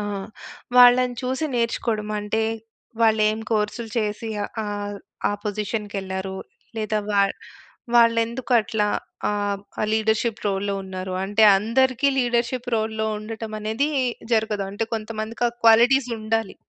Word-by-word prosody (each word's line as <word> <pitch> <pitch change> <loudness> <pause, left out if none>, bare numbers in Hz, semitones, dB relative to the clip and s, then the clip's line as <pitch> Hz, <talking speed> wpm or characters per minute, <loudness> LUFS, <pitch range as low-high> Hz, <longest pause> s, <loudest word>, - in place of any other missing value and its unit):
ఆ! - - -2 0.7
వాళ్ళని 250 0 +7
చూసి 260 +4 -1
నేర్చుకోడం. 230 -2 -1
అంటే 210 +2 -1 0.6
వాళ్ళేం 215 -1 +3
కోర్స్‌లు 220 +1 -1
చేసి 215 +1 -2 0.2
ఆహ్, - - -6
ఆహ్, 205 0 -4 0.3
ఆ - - 0
పొజిషన్‌కెళ్లారు, 200 -2 -3 0.4
లేదా 215 0 0
వాళ్ 200 -1 +3 0.6
వాళ్ళెందుకట్లా 230 -2 +3 0.4
ఆహ్, 205 -1 -1 0.3
లీడర్‌షిప్ 220 +1 +1
రోల్‌లో 200 0 -1
ఉన్నారు. 185 0 -5
అంటే, 205 +3 +1 0.2
అందరికి 255 +5 +2
లీడర్‌షిప్ 245 0 0
రోల్‌లో 220 0 -1
ఉండటం 220 +1 -7
అనేది 220 +7 0 0.4
జరగదు. 220 -3 +1
అంటే 205 +3 -2
కొంతమందికి 220 +1 -4
ఆ - - -5
క్వాలిటీస్ 240 +3 +6
ఉండాలి. 220 -1 -1
220 Hz, 110 wpm, -23 LUFS, 210-235 Hz, 0.7 s, వాళ్ళని